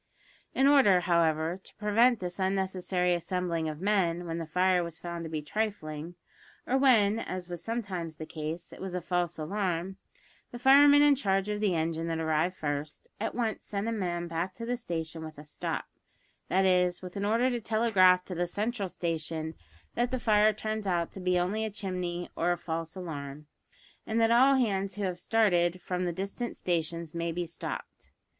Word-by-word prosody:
In 265 - +4
order, 265 -11 +6
however, 170 0 +1
to - - -15
prevent 225 +3 +3
this 180 +1 -5
unnecessary 190 -1 0
assembling 175 -2 -1
of 155 -1 -6
men 180 -4 +1
when 165 0 -3
the 165 - -5
fire 180 +2 +2
was 170 -1 -7
found 170 -1 -6
to - - -5
be 155 -1 -3
trifling, 170 -4 -3 0.5
or 255 - 0
when, 225 -6 +4
as 185 -5 -5
was 175 -1 -6
sometimes 190 -8 -3
the 155 - -7
case, 155 +2 -5
it - - -11
was 190 -1 -4
a - - 0
false 175 -1 -1
alarm, 185 +2 -2 0.5
the 240 - -8
fireman 285 +3 +7
in 290 -1 +6
charge 195 -6 0
of 210 0 -1
the 200 -5 +2
engine 165 0 -1
that 165 -1 -1
arrived 160 +3 0
first, 145 0 -4
at 225 - -3
once 230 -3 -1
sent 200 +1 -3
a - - 0
man 175 -5 -2
back 170 +3 -3
to 230 - -6
the 245 +1 -1
station 165 -6 -5
with 155 -1 -9
a 150 - -10
"stop," 150 - -4 0.6
that 190 +1 +3
is, 180 -1 +2
with 180 -1 -8
an 200 - -2
order 230 +5 +2
to 240 -1 -2
telegraph 200 -5 +4
to 185 - -5
the 175 0 -1
central 210 +1 -2
station 160 -2 -3 0.4
that 240 0 0
the 255 - -2
fire 215 -2 +4
turns 215 0 -4
out 170 -2 0
to - - -8
be 180 -1 +1
only 190 +5 0
a 220 - -1
chimney 180 -4 -4
or 175 +2 +1
a 175 - 0
false 165 0 -4
alarm, 150 -5 -6 0.6
and 220 +1 0
that 225 0 +4
all 265 +4 +6
hands 200 -6 0
who 205 - -3
have 180 -2 -2
started 180 -4 +2
from 180 0 -2
the 175 - 0
distant 200 +7 -4
stations 165 -2 -2
may 170 0 -2
be 175 +1 -2
"stopped." 170 - -7
180 Hz, 190 wpm, -29 LUFS, 170-210 Hz, 0.6 s, fireman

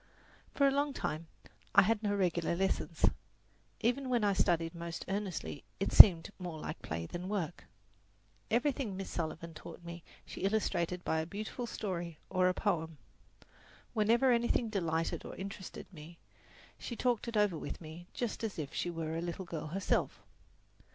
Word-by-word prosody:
For 280 - +5
a - - +4
long 285 +1 +1
time 160 - -3 0.5
I - - +9
had 215 +2 +1
no 205 -2 0
regular 175 -3 +1
lessons. 190 +2 +1 0.8
Even 255 +3 +1
when 240 -3 +2
I 200 -1 +3
studied 165 -3 +1
most 170 -1 -6
earnestly 190 - -3 0.2
it - - -1
seemed 175 -3 +11
more 175 -4 -5
like 155 - -6
play 85 +1 -4
than 175 - -6
work. 180 -5 -3 0.8
Everything 240 -4 0
Miss 195 - -5
Sullivan 165 0 -4
taught 165 - -10
me 170 0 -7 0.2
she - - -8
illustrated 180 -3 0
by 160 - +1
a 160 - -3
beautiful 215 +6 -5
story 175 -7 -4
or 185 -1 +3
a - - +1
poem. 165 -6 -1 1.0
Whenever 235 +4 +4
anything 235 -1 +2
delighted 165 -5 -1
or - - -8
interested 190 0 -7
me 165 +1 -11 0.6
she 240 - -5
talked 245 -1 0
it 230 -2 -2
over 205 -4 +3
with - - -5
me 165 +2 -10
just 235 -2 -3
as 220 -3 -3
if 150 -2 -4
she - - -1
were 165 -2 -3
a 165 - -2
little 175 +2 -4
girl 160 -3 -5
herself. 185 +5 -1
185 Hz, 165 wpm, -33 LUFS, 165-215 Hz, 1.0 s, seemed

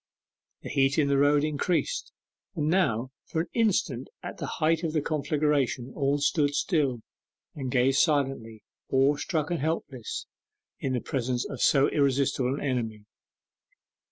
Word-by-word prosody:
The - - -6
heat 135 0 +2
in 145 -3 +3
the 140 - +3
road 145 +1 +4
increased, 165 - -1 0.4
and 150 -3 -1
now 130 - +1 0.2
for 160 - -1
an 165 - -6
instant 175 - +1 0.2
at - - -7
the - - -3
height 160 0 +2
of 165 -3 -2
the 155 - +1
conflagration 145 -4 0
all 140 -1 +1
stood 145 0 +1
still, 140 - 0 0.5
and 135 -3 -5
gazed 130 +2 +3
silently, 135 -8 0 0.3
awestruck 145 +4 +1
and 170 - 0
helpless, 135 -5 -3 0.5
in 130 - -2
the 125 - -1
presence 125 -2 -2
of 135 - -6
so 140 -1 +5
irresistible 135 -2 +1
an - - -6
enemy. 115 -6 -2
140 Hz, 145 wpm, -27 LUFS, 130-155 Hz, 0.5 s, so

